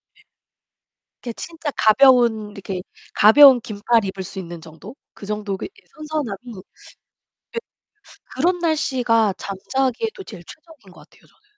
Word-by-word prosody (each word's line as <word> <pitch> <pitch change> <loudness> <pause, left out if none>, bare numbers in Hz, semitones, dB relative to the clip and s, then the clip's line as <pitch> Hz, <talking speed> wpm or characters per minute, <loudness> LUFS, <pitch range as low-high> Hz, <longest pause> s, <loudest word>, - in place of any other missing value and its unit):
네. 425 - -25 1.0
이렇게 235 - -5
진짜 330 -3 -6
가벼운 230 -2 +4
이렇게 195 -2 -6 0.3
가벼운 255 +4 +7
긴팔 220 0 0
입을 190 0 -5
수 190 - -9
있는 175 -2 -8
정도 165 +8 -13 0.2
그 200 - -11
정도 210 -2 -3 0.4
선선함이 305 -9 -4 0.2
예 - - -9 1.8
그런 350 +7 +1
날씨가 250 - +1
잠자기에도 265 - -3
제일 190 - -11
최적인 310 - -16
것 - - -18
같아요, - - -24
저는. 440 - -31
230 Hz, 275 characters per minute, -21 LUFS, 200-290 Hz, 1.8 s, 가벼운